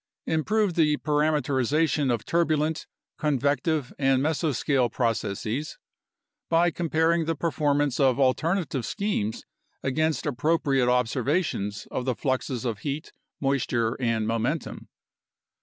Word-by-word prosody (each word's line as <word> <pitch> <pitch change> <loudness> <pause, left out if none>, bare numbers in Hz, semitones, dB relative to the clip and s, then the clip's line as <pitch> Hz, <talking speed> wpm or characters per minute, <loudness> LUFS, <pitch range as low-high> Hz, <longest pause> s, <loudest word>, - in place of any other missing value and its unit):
Improve 200 +5 +1
the 150 -3 +3
parameterization 150 -1 +1
of 115 -3 -2
turbulent, 160 -2 0 0.3
convective, 145 0 0
and 135 -2 +3
mesoscale 145 -5 +1
processes 115 +3 -2 0.7
by 170 +1 +3
comparing 165 0 +1
the 165 +1 -1
performance 145 -4 0
of 135 -2 +3
alternative 140 +1 +1
schemes 200 - -2 0.4
against 155 +4 0
appropriate 140 -2 +1
observations 125 - 0
of 125 - -3
the 130 -2 0
fluxes 130 +1 -2
of 115 -4 -2
heat, 145 +1 -5 0.3
moisture, 125 -4 0
and 115 -3 0
momentum. 115 +8 -2
145 Hz, 105 wpm, -26 LUFS, 125-160 Hz, 0.7 s, the